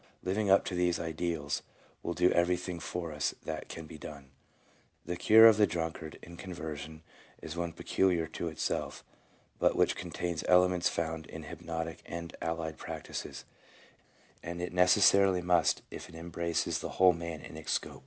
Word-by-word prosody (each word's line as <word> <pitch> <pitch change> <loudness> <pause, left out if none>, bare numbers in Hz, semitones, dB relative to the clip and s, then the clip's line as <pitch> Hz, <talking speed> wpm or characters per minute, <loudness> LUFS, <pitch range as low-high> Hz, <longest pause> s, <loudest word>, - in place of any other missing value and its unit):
Living 100 +2 0
up 95 - +6
to - - -3
these 90 -1 +1
ideals 80 -2 -2 0.4
will 85 - -3
do 90 0 +4
every 90 +1 +3
thing 90 -1 -5
for 85 0 -4
us 75 -1 -1
that 80 -1 -5
can 80 - -7
be 80 0 -11
done." 70 -3 -10 0.7
2 - - -5
The - - 0
cure 110 +5 +8
of 110 -2 +8
the 105 -1 +5
drunkard 80 -2 -4
in 85 0 -11
conversion 80 -4 -7 0.4
is 80 - -7
one 85 -1 -2
peculiar 85 0 +1
to 85 - -5
itself, 80 - -3 0.6
but - - +3
which - - +3
contains 85 -2 -3
elements 90 -1 +4
found 80 -1 -3
in - - -8
hypnotic 80 0 -5
and 85 0 -6
allied 80 -1 -3
practices, - - -6 1.0
and 85 +1 -6
it 90 0 -4
necessarily 95 0 +5
must 90 -1 +3
if - - -8
it 85 - -13
embraces 85 0 -1
the - - -6
whole 90 -1 +7
man 85 -1 -5
in - - -10
its 80 -1 -5
scope. - - -2
85 Hz, 170 wpm, -31 LUFS, 80-90 Hz, 1.0 s, cure